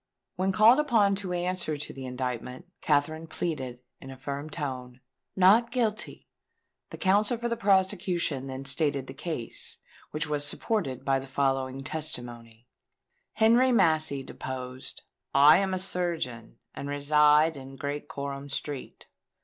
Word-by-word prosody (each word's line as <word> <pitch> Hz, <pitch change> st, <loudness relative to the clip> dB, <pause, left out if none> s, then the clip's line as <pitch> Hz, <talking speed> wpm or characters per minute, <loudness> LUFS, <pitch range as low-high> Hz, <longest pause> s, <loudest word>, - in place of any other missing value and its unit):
When 190 Hz, +2 st, 0 dB
called 220 Hz, +7 st, +6 dB
upon 225 Hz, -9 st, +3 dB
to 190 Hz, -2 st, -4 dB
answer 175 Hz, -3 st, -2 dB
to 145 Hz, -, -7 dB
the 135 Hz, -1 st, -7 dB
indictment, 125 Hz, +3 st, -4 dB, 0.2 s
Katherine 155 Hz, +2 st, 0 dB
pleaded, 130 Hz, -8 st, -4 dB, 0.2 s
in 135 Hz, -, -11 dB
a 135 Hz, -, -9 dB
firm 140 Hz, +3 st, -5 dB
tone, 130 Hz, -5 st, -5 dB, 0.4 s
"Not 205 Hz, +6 st, +5 dB
Guilty." 225 Hz, -4 st, -2 dB, 0.6 s
The -, -, -8 dB
counsel 205 Hz, +5 st, +2 dB
for 235 Hz, +1 st, -2 dB
the 235 Hz, -, -1 dB
prosecution 185 Hz, -, +1 dB
then 135 Hz, 0 st, -6 dB
stated 140 Hz, -1 st, +1 dB
the 135 Hz, -, -9 dB
case, 140 Hz, -5 st, -5 dB, 0.3 s
which 150 Hz, +1 st, -2 dB
was 150 Hz, -1 st, -1 dB
supported 145 Hz, -, -2 dB
by 135 Hz, -1 st, +2 dB
the 135 Hz, -, -9 dB
following 135 Hz, 0 st, -1 dB
testimony:— 120 Hz, -6 st, -4 dB, 0.7 s
Henry 235 Hz, +4 st, +4 dB
Massey 155 Hz, -, +3 dB
deposed: 130 Hz, -1 st, -7 dB, 0.3 s
"I 145 Hz, +5 st, +8 dB
am 195 Hz, -1 st, 0 dB
a 185 Hz, -, 0 dB
surgeon, 170 Hz, -, -3 dB, 0.2 s
and 140 Hz, -, -6 dB
reside 150 Hz, +2 st, +4 dB
in 135 Hz, 0 st, -10 dB
Great 145 Hz, +2 st, -4 dB
Coram 140 Hz, 0 st, -6 dB
Street. 140 Hz, -1 st, -6 dB
150 Hz, 140 wpm, -28 LUFS, 135-185 Hz, 0.7 s, I